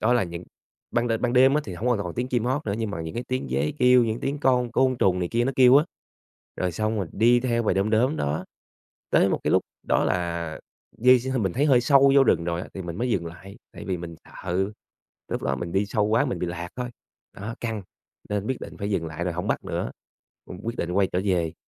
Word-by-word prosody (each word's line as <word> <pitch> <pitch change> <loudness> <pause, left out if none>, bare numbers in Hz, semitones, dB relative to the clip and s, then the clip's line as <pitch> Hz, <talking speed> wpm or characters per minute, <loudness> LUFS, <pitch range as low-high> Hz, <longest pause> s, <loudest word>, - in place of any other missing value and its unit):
đó 110 +3 +3
là 120 - +3
những 85 0 -7 0.5
ban 120 0 0
đên 115 -1 0
ban 120 -1 +1
đêm 130 +2 +6
á 150 - +3
thì 95 - -6
hông 110 +8 -2
có 120 - +3
còn 85 - -5
tiếng 125 +1 -2
chim 120 -3 0
hót 130 +3 -1
nữa, 100 - 0
nhưng 110 -2 -2
mà 85 - -4
những 80 0 -6
cái 120 - -3
tiếng 130 - -2
dế 70 +4 0
kêu, 125 -1 +6
những 115 0 -2
tiếng 140 +2 -2
con 125 -3 +2
côn 130 0 +2
trùng 95 -5 +2
này 90 -1 -1
kia 120 +1 +1
nó 135 - 0
kêu 130 0 +7
á, 150 - +5 0.7
rồi 90 -1 -1
xong 110 +3 -1
rồi 95 -5 -2
đi 120 +3 +4
theo 120 -2 0
bầy 110 - +1
đom 100 +3 +1
đóm 125 +7 +2
đó 75 +2 -2 0.7
tới - - +4
một - - -1
cái - - +1
lúc - - +4 0.3
đó - - +3
là 85 -3 -2 0.4
di 125 +2 +6
x 130 +2 -3
mình 95 -5 0
thấy 140 +8 +1
hơi 130 -4 +5
sâu 140 +2 +5
vô 140 -1 +7
rừng 85 - +2
rồi 85 0 -2
á - - -8
thì 95 - -5
mình 85 -1 -6
mới 125 +1 0
dừng 90 -6 0
lại, 95 +4 -10 0.2
tại - - -9
vì 95 -2 -1
mình 85 -1 -8
sợ 95 +3 -3 0.6
lúc - - -3
đó 70 - 0
mình 85 +4 -5
đi 100 +2 +1
sâu 105 +1 0
quá 115 +5 +3
mình 125 - -2
bị 90 - -2
lạc 85 0 -5
thôi. 125 -1 -4 0.4
Đó, 110 +4 -6
căng! 110 -3 -3 0.5
Nên 105 0 -1
biết 130 - -1
định - - -8
phải 100 0 -3
dừng 85 -5 -1
lại 80 +2 -4
rồi 90 - -1
hổng 90 - -3
bắt - - -1
nữa, - - -3 0.6
cũng 90 - -9
quyết 115 +1 -3
định 85 - -2
quay 95 +1 +3
trở 90 - +1
về. 85 -4 0
110 Hz, 265 wpm, -25 LUFS, 90-125 Hz, 0.7 s, kêu